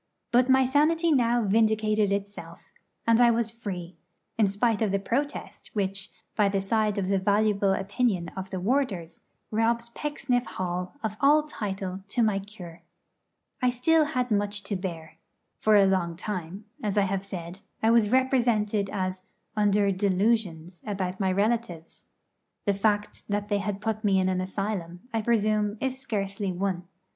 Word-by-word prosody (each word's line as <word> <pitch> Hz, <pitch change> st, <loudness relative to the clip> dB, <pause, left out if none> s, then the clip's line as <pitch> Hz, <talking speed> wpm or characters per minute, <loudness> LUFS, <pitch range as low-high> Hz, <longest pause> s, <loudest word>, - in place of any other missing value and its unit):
But 250 Hz, +2 st, +4 dB
my 265 Hz, 0 st, +5 dB
sanity 315 Hz, +5 st, +3 dB
now 240 Hz, -4 st, +3 dB
vindicated 215 Hz, 0 st, +2 dB
itself, 200 Hz, 0 st, -5 dB, 0.3 s
and 230 Hz, +1 st, +4 dB
I 240 Hz, -, +7 dB
was 230 Hz, -1 st, +1 dB
free, 185 Hz, -6 st, -6 dB, 0.4 s
in 215 Hz, -3 st, +3 dB
spite 205 Hz, +3 st, +1 dB
of 215 Hz, -3 st, +2 dB
the 200 Hz, -, +2 dB
protest 275 Hz, +9 st, -3 dB
which, 195 Hz, -1 st, -1 dB, 0.3 s
by 205 Hz, -2 st, +3 dB
the 195 Hz, 0 st, 0 dB
side 210 Hz, +1 st, 0 dB
of 195 Hz, -2 st, -1 dB
the 195 Hz, 0 st, +2 dB
valuable 200 Hz, 0 st, +2 dB
opinion 195 Hz, -2 st, 0 dB
of 190 Hz, 0 st, -7 dB
the 190 Hz, -, -4 dB
warders, 190 Hz, -, -1 dB, 0.3 s
robs 230 Hz, +2 st, +1 dB
Pecksniff 275 Hz, -2 st, -1 dB
Hall 180 Hz, +2 st, -4 dB
of 215 Hz, -1 st, -3 dB
all 295 Hz, +2 st, +5 dB
title 195 Hz, -9 st, -4 dB
to 235 Hz, +3 st, +1 dB
my 210 Hz, -3 st, +2 dB
'cure.' 180 Hz, -5 st, -11 dB, 0.8 s
I 250 Hz, -, +3 dB
had 245 Hz, -, +1 dB
still 310 Hz, +5 st, +3 dB, 0.2 s
much 205 Hz, -1 st, 0 dB
to 200 Hz, +1 st, -3 dB
bear. 170 Hz, -4 st, -6 dB, 0.4 s
For 215 Hz, 0 st, +4 dB
a 200 Hz, -1 st, +7 dB
long 185 Hz, -3 st, +1 dB
time, 185 Hz, +1 st, -5 dB, 0.2 s
as 210 Hz, -2 st, -2 dB
I 205 Hz, -, +5 dB
have 195 Hz, 0 st, -1 dB
said, 185 Hz, -1 st, -7 dB, 0.2 s
I 225 Hz, -, +5 dB
was 230 Hz, -3 st, +4 dB
represented 235 Hz, -5 st, +2 dB
as 185 Hz, -2 st, -3 dB, 0.3 s
under 205 Hz, -1 st, +3 dB
'delusions' 185 Hz, -3 st, 0 dB
about 190 Hz, -2 st, -3 dB
my 190 Hz, -2 st, +1 dB
relatives. 205 Hz, -4 st, -2 dB, 0.6 s
The 200 Hz, -, +3 dB
fact 205 Hz, +1 st, 0 dB
that 205 Hz, 0 st, -1 dB
they 205 Hz, -1 st, +1 dB, 0.2 s
put 215 Hz, +1 st, -2 dB
me 200 Hz, -2 st, +3 dB
in 185 Hz, 0 st, +2 dB
an 185 Hz, 0 st, 0 dB
asylum, 185 Hz, -2 st, -4 dB
I 225 Hz, -, +1 dB
presume, 215 Hz, -2 st, +1 dB
is 265 Hz, 0 st, -2 dB
scarcely 200 Hz, -5 st, -2 dB
one. 180 Hz, -1 st, -2 dB
205 Hz, 160 wpm, -27 LUFS, 190-230 Hz, 0.8 s, I